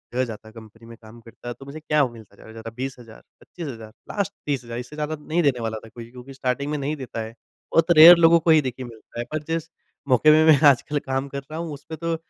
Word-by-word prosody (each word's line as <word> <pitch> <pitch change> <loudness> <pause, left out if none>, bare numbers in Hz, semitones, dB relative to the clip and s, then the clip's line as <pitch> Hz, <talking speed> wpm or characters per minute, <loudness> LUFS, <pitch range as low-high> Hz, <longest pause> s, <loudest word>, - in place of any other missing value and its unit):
ग 130 - +2
जाता 110 -1 -9
है - - -13
कंपनी 115 0 -15
में 115 -1 -12
काम 110 +2 -14
करता 115 +1 -14
है 120 - -3
तो 135 - -11
मुझे 145 +3 -9
क्या 150 -2 +1
मिलता 110 -4 -15
ज़्यादा-ज़्यादा 110 +2 -11
20 135 +1 -5
हज़ार, 115 -2 -14 0.2
25 170 -4 -9
हज़ार 110 -4 -9 0.2
लास्ट 200 -4 -2
30 140 -4 -2
हज़ार 120 +1 -6
इससे 125 +5 -9
ज़्यादा 155 +1 -3
नहीं 160 +3 -1
देने 130 -4 +1
वाला 110 -1 -3
था - - -13
कोई 115 0 -11
क्योंकि 125 +2 -12
स्टार्टिंग 130 +2 -2
में 150 - -1
नहीं 145 +2 -3
देता 125 -5 -6
है, 110 0 -7 0.4
बहुत 165 +1 +3
रेयर 170 +2 +11
लोगों 165 0 +5
को 165 - -2
ही 155 -1 +6
देखिए 130 -1 -5
मिलता 115 0 -12
है। 120 - -3
पर 155 -1 -3
जिस 165 0 -4 0.4
मौके 140 +5 +5
मैं 155 -3 +7
आजकल 145 +3 0
काम 135 +1 -3
कर 140 - -5
रहा 160 - -5
हूँ, 165 -3 -5
उसमें 155 +3 -9
तो 165 +1 -2
135 Hz, 255 wpm, -23 LUFS, 115-155 Hz, 0.4 s, रेयर